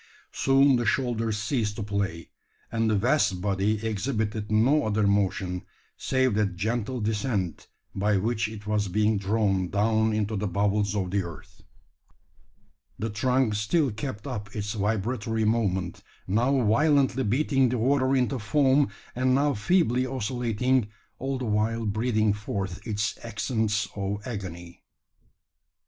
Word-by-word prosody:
Soon 135 Hz, 0 st, +4 dB
the 120 Hz, -, -1 dB
shoulders 115 Hz, -4 st, 0 dB
ceased 105 Hz, -1 st, -1 dB
to 105 Hz, -, -4 dB
play; 100 Hz, -5 st, -3 dB, 0.4 s
and 115 Hz, 0 st, +1 dB
the 110 Hz, -, +2 dB
vast 115 Hz, -3 st, +2 dB
body 100 Hz, +3 st, 0 dB
exhibited 110 Hz, -1 st, -2 dB
no 130 Hz, +8 st, +4 dB
other 105 Hz, 0 st, +1 dB
motion, 95 Hz, -2 st, 0 dB, 0.3 s
save 130 Hz, -3 st, +1 dB
that 100 Hz, -3 st, 0 dB
gentle 115 Hz, +6 st, -2 dB
descent 105 Hz, -4 st, -2 dB, 0.3 s
by 100 Hz, +1 st, +1 dB
which 110 Hz, +2 st, 0 dB
it 105 Hz, -1 st, -9 dB
was 105 Hz, -1 st, 0 dB
being 105 Hz, +2 st, +1 dB
drawn 100 Hz, -2 st, 0 dB
down 110 Hz, +2 st, +2 dB
into 110 Hz, 0 st, -1 dB
the 105 Hz, +1 st, -1 dB
bowels 100 Hz, +2 st, 0 dB
of 95 Hz, -3 st, -1 dB
the 100 Hz, 0 st, +1 dB
earth! 85 Hz, -3 st, -10 dB, 1.4 s
The 110 Hz, 0 st, -3 dB
trunk 125 Hz, +2 st, +1 dB
still 120 Hz, +8 st, +1 dB
kept 105 Hz, 0 st, -6 dB
up 105 Hz, -6 st, -6 dB
its 105 Hz, 0 st, -3 dB
vibratory 110 Hz, +2 st, -1 dB
movement, 95 Hz, -5 st, 0 dB, 0.2 s
now 125 Hz, +7 st, +2 dB
violently 135 Hz, +2 st, +3 dB
beating 135 Hz, +3 st, +2 dB
the 125 Hz, -, -1 dB
water 130 Hz, +2 st, +2 dB
into 130 Hz, 0 st, +1 dB
foam, 140 Hz, +3 st, +3 dB, 0.3 s
and 130 Hz, +1 st, +2 dB
now 145 Hz, +1 st, +2 dB
feebly 130 Hz, -, +2 dB
oscillating, 125 Hz, -1 st, 0 dB, 0.3 s
all 135 Hz, 0 st, -2 dB
the 130 Hz, -, -4 dB
while 110 Hz, +1 st, 0 dB
breathing 110 Hz, 0 st, +1 dB
forth 100 Hz, -1 st, -5 dB
its 105 Hz, -2 st, -2 dB
accents 110 Hz, -1 st, -1 dB
of 100 Hz, 0 st, -2 dB
agony. 85 Hz, -7 st, -7 dB
110 Hz, 135 wpm, -26 LUFS, 105-125 Hz, 1.4 s, Soon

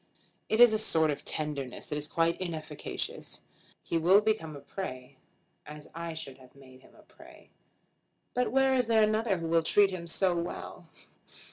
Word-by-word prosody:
It 220 Hz, -, +1 dB
is 240 Hz, -2 st, +8 dB
a 215 Hz, -, +2 dB
sort 160 Hz, -7 st, +3 dB
of 145 Hz, -, -6 dB
tenderness 145 Hz, -4 st, -3 dB
that 150 Hz, -, -5 dB
is 150 Hz, 0 st, -2 dB
quite 170 Hz, +2 st, 0 dB
inefficacious. 155 Hz, -4 st, -5 dB, 0.4 s
He 165 Hz, -, -1 dB
will 180 Hz, +5 st, +6 dB
become 210 Hz, -8 st, -1 dB
a -, -, -8 dB
prey, 130 Hz, -8 st, -7 dB, 0.5 s
as 150 Hz, 0 st, -11 dB
I 165 Hz, 0 st, -6 dB
should 140 Hz, -5 st, -8 dB
have 130 Hz, 0 st, -18 dB
made 130 Hz, -2 st, -16 dB
him -, -, -21 dB
a -, -, -19 dB
prey. -, -, -18 dB, 0.8 s
But 250 Hz, -3 st, 0 dB
where 270 Hz, +1 st, +3 dB
is 250 Hz, -3 st, +1 dB
there 225 Hz, -1 st, +4 dB
another 215 Hz, -1 st, +1 dB
who 165 Hz, -1 st, -4 dB
will 165 Hz, 0 st, +3 dB
treat 200 Hz, +4 st, +4 dB
him 175 Hz, -2 st, -6 dB
so 180 Hz, +1 st, +2 dB
well?" 170 Hz, 0 st, -6 dB
170 Hz, 175 wpm, -29 LUFS, 150-215 Hz, 0.8 s, is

